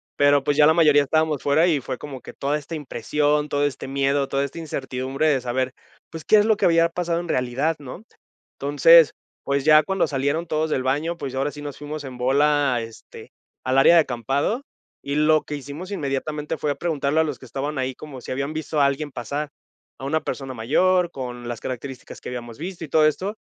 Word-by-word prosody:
pero 145 Hz, -1 st, +4 dB
pues, 145 Hz, 0 st, 0 dB
ya 150 Hz, -, +7 dB
la 160 Hz, -, +6 dB
mayoría 150 Hz, -3 st, +5 dB
estábamos 155 Hz, 0 st, +1 dB
fuera 155 Hz, +4 st, +3 dB
y 160 Hz, -5 st, +2 dB
fue 125 Hz, -, -5 dB
como 135 Hz, -2 st, -8 dB
que -, -, -11 dB
toda 145 Hz, +2 st, -1 dB
esta 150 Hz, +2 st, -7 dB
impresión, 150 Hz, +1 st, 0 dB
todo 145 Hz, 0 st, +1 dB
este 145 Hz, -2 st, -4 dB
miedo, 140 Hz, +1 st, +1 dB
toda 135 Hz, +1 st, 0 dB
esta 140 Hz, +4 st, -5 dB
incertidumbre 135 Hz, -1 st, -2 dB
de 140 Hz, -4 st, +2 dB
saber 130 Hz, +1 st, -2 dB, 0.4 s
pues, 165 Hz, -1 st, -7 dB
¿qué 215 Hz, -, +5 dB
es 210 Hz, -, +4 dB
lo 220 Hz, -1 st, +4 dB
que -, -, 0 dB
había 165 Hz, 0 st, +4 dB
pasado 170 Hz, 0 st, -1 dB
en 175 Hz, -, -6 dB
realidad? 130 Hz, +3 st, 0 dB
¿No? 145 Hz, +8 st, -9 dB, 0.6 s
Entonces 145 Hz, +3 st, +6 dB, 0.3 s
pues, 140 Hz, 0 st, -1 dB
ya 155 Hz, 0 st, +7 dB
cuando 195 Hz, +1 st, 0 dB
salieron 145 Hz, +4 st, -1 dB
todos 155 Hz, -1 st, -1 dB
del 130 Hz, -4 st, 0 dB
baño, 150 Hz, +6 st, -1 dB
pues, 135 Hz, -5 st, -5 dB
ya 130 Hz, -, -2 dB
ahora 140 Hz, +2 st, 0 dB
sí 145 Hz, -, -10 dB
nos 145 Hz, -2 st, -7 dB
fuimos 150 Hz, 0 st, -6 dB
en 130 Hz, -2 st, -8 dB
bola 140 Hz, +1 st, +2 dB
este, 115 Hz, 0 st, -11 dB, 0.3 s
al 130 Hz, +1 st, +1 dB
área 135 Hz, +5 st, +7 dB
de 170 Hz, -, +8 dB
acampado, 140 Hz, -, -1 dB, 0.4 s
y 140 Hz, -, -2 dB
lo 155 Hz, +1 st, +4 dB
que 150 Hz, -, -5 dB
hicimos 145 Hz, +7 st, -8 dB
inmediatamente, 150 Hz, -2 st, -3 dB
fue 150 Hz, -, -1 dB
a -, -, -2 dB
preguntarle 155 Hz, -2 st, 0 dB
a 160 Hz, -, +5 dB
los 145 Hz, -4 st, -4 dB
que -, -, -12 dB
estaban 140 Hz, +4 st, -4 dB
ahí, 130 Hz, 0 st, -1 dB
como, 135 Hz, -2 st, -10 dB
¿si -, -, -8 dB
habían 140 Hz, +3 st, -2 dB
visto 155 Hz, -1 st, -3 dB
a 140 Hz, -, +5 dB
alguien 140 Hz, +1 st, -1 dB
pasar? 145 Hz, +5 st, -4 dB, 0.5 s
A 135 Hz, -, -6 dB
una 155 Hz, +3 st, 0 dB
persona 135 Hz, -2 st, -4 dB
mayor 175 Hz, +10 st, +2 dB
con 125 Hz, -2 st, -6 dB
las 120 Hz, -, -4 dB
características 130 Hz, +1 st, -7 dB
que -, -, -7 dB
habíamos 120 Hz, -2 st, -7 dB
visto 175 Hz, +1 st, -6 dB
y -, -, -12 dB
todo 155 Hz, +2 st, +4 dB
esto. 190 Hz, +8 st, 0 dB
145 Hz, 220 wpm, -23 LUFS, 135-155 Hz, 0.6 s, de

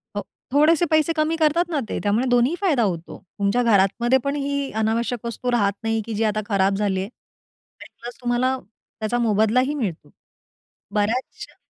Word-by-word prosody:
हो. -, -, -1 dB, 0.3 s
थोडेसे 310 Hz, +4 st, +4 dB
पैसे 315 Hz, +1 st, +3 dB
कमी 310 Hz, +1 st, +1 dB
करतात 320 Hz, +2 st, +2 dB
ना 315 Hz, -4 st, 0 dB
ते, -, -, -2 dB
त्यामुळे 210 Hz, +5 st, +1 dB
दोन्हीही 245 Hz, +6 st, +3 dB
फायदा 305 Hz, -12 st, +2 dB
होतो. 170 Hz, -5 st, -3 dB, 0.2 s
तुमच्या 200 Hz, +5 st, +2 dB
घरातमध्ये 230 Hz, +3 st, +3 dB
पण 280 Hz, +1 st, -1 dB
ही 280 Hz, -1 st, -2 dB
अनावश्यक 230 Hz, +2 st, -1 dB
वस्तू 235 Hz, +2 st, -3 dB
राहत 205 Hz, -4 st, +2 dB
नाही, 225 Hz, 0 st, 0 dB
की 225 Hz, -, -5 dB
जी 215 Hz, +1 st, 0 dB
आता 215 Hz, -1 st, 0 dB
खराब 195 Hz, -1 st, +2 dB
झाली 195 Hz, -2 st, 0 dB
आहे 190 Hz, +2 st, -4 dB, 0.7 s
आणि -, -, -10 dB
प्लस 240 Hz, +1 st, -7 dB
तुम्हाला 250 Hz, +2 st, +1 dB, 0.4 s
त्याचा 220 Hz, +2 st, -1 dB
मोबदलाही 230 Hz, +4 st, +2 dB
मिळतो. 210 Hz, -, -4 dB, 0.8 s
बऱ्याचश्या 220 Hz, +5 st, -2 dB
235 Hz, 165 wpm, -22 LUFS, 210-280 Hz, 0.8 s, थोडेसे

